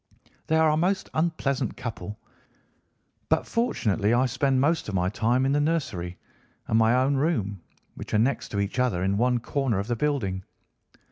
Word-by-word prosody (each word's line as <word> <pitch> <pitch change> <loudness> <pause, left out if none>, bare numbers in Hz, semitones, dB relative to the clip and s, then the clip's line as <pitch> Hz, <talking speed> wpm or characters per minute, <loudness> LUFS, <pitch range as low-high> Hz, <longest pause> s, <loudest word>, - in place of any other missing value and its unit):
They 160 - +2
are 160 -1 +4
a 155 - +1
most 185 +4 0
unpleasant 140 -6 -1
couple, 110 -3 -6 1.1
but - - +2
fortunately 115 - +1
I 125 +2 +3
spend 130 +1 +1
most 155 -1 +1
of 100 - -3
my 90 0 +1
time 120 +5 +1
in 135 - +2
the 145 +1 +2
nursery 135 - -2 0.5
and 110 - +3
my 115 +2 +4
own 135 +2 +2
room, 110 - -1 0.3
which - - -9
are - - +5
next 120 +6 +1
to 100 - -2
each 100 +5 -2
other 120 -9 +1
in 95 +1 +1
one 125 +2 +2
corner 130 -2 -1
of 100 - -1
the 120 +2 -1
building. 110 -9 -1
125 Hz, 180 wpm, -26 LUFS, 105-145 Hz, 1.1 s, are